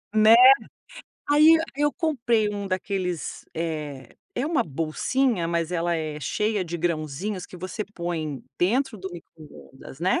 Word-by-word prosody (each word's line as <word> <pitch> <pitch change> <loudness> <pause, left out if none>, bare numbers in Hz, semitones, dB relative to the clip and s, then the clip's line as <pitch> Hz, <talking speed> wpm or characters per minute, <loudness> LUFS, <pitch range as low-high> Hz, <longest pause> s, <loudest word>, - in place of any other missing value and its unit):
Né? 215 +1 +7 0.9
Aí 295 +2 +6
e - - 0
aí 295 -3 -4
eu 295 - +2
comprei 240 -9 +1
um 205 -1 -4
daqueles, 185 -2 -3
eh, 150 -6 -5 0.2
é 260 +4 -1
uma 320 -3 +2
bolsinha, 170 - 0
mas 170 0 -1
ela 170 0 0
é 155 -1 -4
cheia 210 - -1
de 175 0 -4
grãozinhos 170 +4 -3
que 180 - -12
você 185 +4 -5
põe 160 -5 -4 0.2
dentro 240 +6 +1
do 190 0 -6
microondas, 155 -4 -13
né, 185 +2 +2
180 Hz, 145 wpm, -25 LUFS, 160-220 Hz, 0.9 s, Né